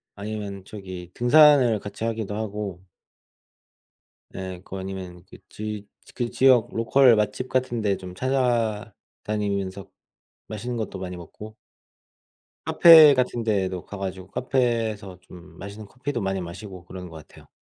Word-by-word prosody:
아니면 100 -2 -6
저기 95 -4 -9
등산을 130 -3 +5
같이 100 +2 -8
하기도 110 -3 -3
하고 105 -4 -5 1.5
예 95 -1 -6
그거 95 - -7
아니면 95 -2 -7
그 - - -13
지 105 -1 -6 0.3
그 120 -2 -2
지역 130 -4 +4
로컬 120 +1 +5
맛집 105 +4 -1
같은 125 -3 -1
데 100 -2 +1
좀 90 -1 -10
찾아다니면서 105 -5 -2 0.6
맛있는 120 +3 -5
것도 110 -4 -4
많이 90 -1 -6
먹고 105 +6 -11 1.1
카페 160 -4 +8
같은 125 -2 0
데도 95 -4 -1
가 100 - -8
가지고 95 -1 -5
카페에서 115 -5 -1
좀 90 0 -15
맛있는 100 +1 -9
커피도 130 -1 -4
많이 95 -1 -2
마시고 90 +1 -9
그런 90 -1 -9
것 80 -2 -12
같아요. - - -18
105 Hz, 275 characters per minute, -24 LUFS, 95-120 Hz, 1.5 s, 카페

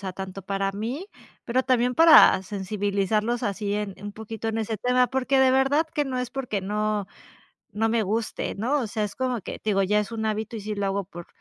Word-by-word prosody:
sea, 190 -2 -5
tanto 190 +1 -7
para 195 +1 -2
mí, 235 - -4 0.4
pero 255 +2 +1
también 250 -1 +2
para 325 - +7
sensibilizarlos 205 +3 -1
así 205 0 -2
en 205 -2 -3
un 205 0 -6
poquito 220 +1 -6
en 225 0 -2
ese 220 0 -2
tema, 250 +3 +3
porque 265 +1 0
de 265 -1 +5
verdad 270 +4 +3
que 295 - +1
no 260 -2 -3
es 250 -1 -3
porque 250 -7 -3
no 210 +1 -1 0.7
no 225 +2 0
me 225 -1 +1
guste, 220 +3 -2
¿no? 250 +8 0
O 235 - -2
sea, 215 +1 -2
es 200 -1 -4
como 255 -2 -1
que - - -7
te 215 - -1
digo, 195 -1 +2
ya 210 +2 +2
es 210 0 -4
un 220 -1 -3
hábito 220 +1 -2
y 220 - -5
sí 210 +1 -4
lo 200 -1 -2
hago 195 +1 -1
por, 175 -2 -11
215 Hz, 225 wpm, -25 LUFS, 200-250 Hz, 0.7 s, para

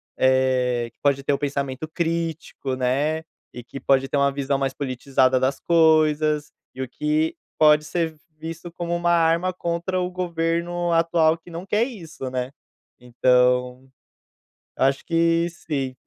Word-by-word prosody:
eh, 130 -2 +2
que - - -49
pode 140 -1 +1
ter 140 - +1
o 140 - -1
pensamento 140 0 -3
crítico, 165 -5 -3
né, 140 +5 0 0.3
e 120 - -9
que 135 - -9
pode 135 -1 +2
ter - - -3
uma 140 0 +3
visão 140 0 -1
mais 135 -1 -1
politizada 130 -1 +1
das 130 +1 0
coisas, 155 -2 +3 0.2
e 130 - -3
o - - -5
que 310 - -1 0.2
pode 150 -1 +5
ser 160 0 -2 0.2
visto 165 +2 -7
como 170 0 -3
uma 175 0 0
arma 170 +2 +2
contra 175 +1 -2
o 180 0 -2
governo 175 0 -1
atual 165 -1 +3
que 170 +1 -17
não 170 +2 -7
quer 210 +3 +1
isso, 165 - -7
né. 125 0 -3 0.5
Então, 125 +1 +1 0.9
eu - - +1
acho 135 0 +1
que 165 0 +2
sim, 140 -6 -4
155 Hz, 155 wpm, -23 LUFS, 130-170 Hz, 0.9 s, pode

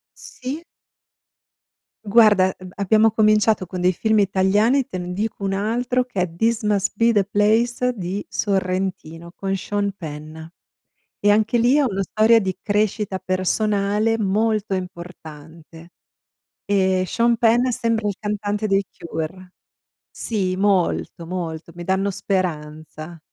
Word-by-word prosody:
Sì. 270 +6 -7 1.4
Guarda, 205 -3 +5
eb 185 -1 -11
abbiamo 215 +3 +3
cominciato 215 -2 +2
con 180 0 -5
dei 180 +1 +3
film 220 +3 +1
italiani. 205 +7 +2
Te 185 - -6
ne 180 0 -5
dico 210 +1 -3
un 195 - -1
altro 240 +5 0
che 200 -7 -3
è 165 -2 -4
This 225 +4 0
Must 205 -2 0
Be 230 0 +3
The 205 -3 +2
Place 230 +5 +1
di 190 0 -4
Sorrentino. 185 -4 -2
Con 195 0 -2
Sean 200 +1 -2
Penn. 155 -4 -8 0.9
E 205 0 +4
anche 220 +3 +2
lì, 240 +4 +3
è 295 - +4
una 195 -7 0
storia 220 +3 +4
di 190 -3 -2
crescita 205 -1 0
personale 205 +4 0
molto 215 0 0
importante. 165 -2 -10 0.8
Ehm, 190 -2 +2
Sean 235 +3 +1
Penn 240 +2 +3
sembra 230 -3 -1
il 200 - -2
cantante 210 0 -2
dei 195 -1 +2
Cure. 170 +3 -6 0.6
Sì, 190 -5 -2
molto, 190 -3 0
molto. 170 -2 -5
Mi 175 - -7
danno 190 +2 0
speranza. 160 -3 -4
200 Hz, 130 wpm, -21 LUFS, 185-220 Hz, 1.4 s, Guarda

